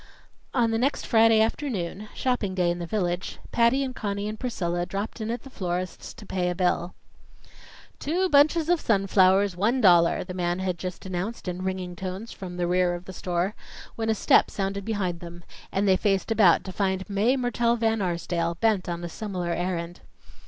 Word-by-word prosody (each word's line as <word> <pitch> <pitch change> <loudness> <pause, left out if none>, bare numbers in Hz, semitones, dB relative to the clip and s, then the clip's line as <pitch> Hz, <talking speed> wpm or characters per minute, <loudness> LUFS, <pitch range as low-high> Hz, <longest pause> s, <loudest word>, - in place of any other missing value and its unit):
On 235 -3 +2
the 225 - 0
next 275 +4 0
Friday 225 -1 +5
afternoon 215 - -2
shopping 235 -7 -1
day 180 -2 +2
in 175 - -4
the 170 - -4
village 180 -3 -2
Patty 235 +3 +3
and 260 -2 -4
Conny 200 -1 -3
and 215 0 -5
Priscilla 175 -8 -2
dropped 200 +5 -4
in 220 - -3
at 235 +1 -3
the 270 - -11
florist's 180 -3 -4
to 215 - -12
pay 180 -2 -1
a 180 - -2
bill. 180 -1 0 1.0
"Two 355 +6 0
bunches 305 +1 +4
of 350 -1 +2
sunflowers, 195 -2 +3
one 220 +8 +1
dollar," 175 -6 +5
the 180 - -7
man 175 -1 -1
had 185 -2 -2
just 185 0 -6
announced 190 +4 -4
in 180 0 -3
ringing 185 -1 -3
tones 190 +5 -6
from 180 -3 -8
the 175 - 0
rear 180 0 +2
of 175 +1 -9
the 190 - -8
store, 180 +2 -1 0.4
when 225 -1 -2
a 220 - +3
step - - +4
sounded 195 0 -3
behind 190 -6 -2
them, 175 0 -10 0.3
and 200 +1 0
they 190 - +5
faced 195 +1 0
about 205 -6 +5
to 190 - -6
find 190 -1 -1
Mae 215 +6 +2
Mertelle 240 -1 +1
Van 225 -1 +1
Arsdale, 170 -1 -1
bent 205 -1 +1
on 170 0 -4
a - - -3
similar 180 -1 -4
errand. 175 0 -3
190 Hz, 190 wpm, -26 LUFS, 180-225 Hz, 1.0 s, Friday